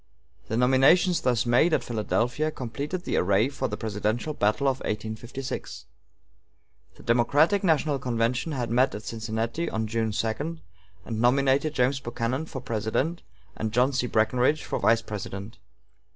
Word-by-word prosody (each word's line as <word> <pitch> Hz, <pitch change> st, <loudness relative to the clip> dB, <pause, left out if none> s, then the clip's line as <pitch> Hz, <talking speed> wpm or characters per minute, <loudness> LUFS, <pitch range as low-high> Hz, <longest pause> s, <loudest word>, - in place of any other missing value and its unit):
The 110 Hz, -, -2 dB
nominations 135 Hz, +9 st, +4 dB
thus 125 Hz, -2 st, +1 dB
made 125 Hz, +8 st, +4 dB
at -, -, -1 dB
Philadelphia 120 Hz, +6 st, -1 dB
completed 145 Hz, +7 st, -5 dB
the -, -, -1 dB
array 100 Hz, +6 st, +3 dB
for 135 Hz, -, -3 dB
the 105 Hz, -, -4 dB
presidential 110 Hz, +7 st, -2 dB
battle 105 Hz, +3 st, +1 dB
of 135 Hz, -1 st, +1 dB
1856. 110 Hz, +5 st, -5 dB, 1.1 s
The -, -, -15 dB
Democratic 145 Hz, -, +3 dB
national 155 Hz, -5 st, +2 dB
convention 125 Hz, +4 st, -1 dB
had 120 Hz, -4 st, -3 dB
met 125 Hz, +1 st, +3 dB
at 105 Hz, -, -7 dB
Cincinnati 115 Hz, +8 st, -3 dB
on 110 Hz, 0 st, -2 dB
June 110 Hz, 0 st, -1 dB
2, 130 Hz, +10 st, -2 dB, 0.5 s
and 110 Hz, -1 st, -3 dB
nominated 135 Hz, +4 st, +2 dB
James 130 Hz, +2 st, +2 dB
Buchanan 120 Hz, +4 st, -3 dB
for 130 Hz, -5 st, -6 dB
President 115 Hz, +9 st, -2 dB, 0.3 s
and 110 Hz, -1 st, -3 dB
John 125 Hz, +4 st, +2 dB
C. 125 Hz, -1 st, 0 dB
Breckinridge 125 Hz, +7 st, +2 dB
for -, -, -3 dB
Vice 115 Hz, 0 st, +3 dB
President. 100 Hz, +1 st, -7 dB
125 Hz, 145 wpm, -26 LUFS, 110-140 Hz, 1.1 s, nominations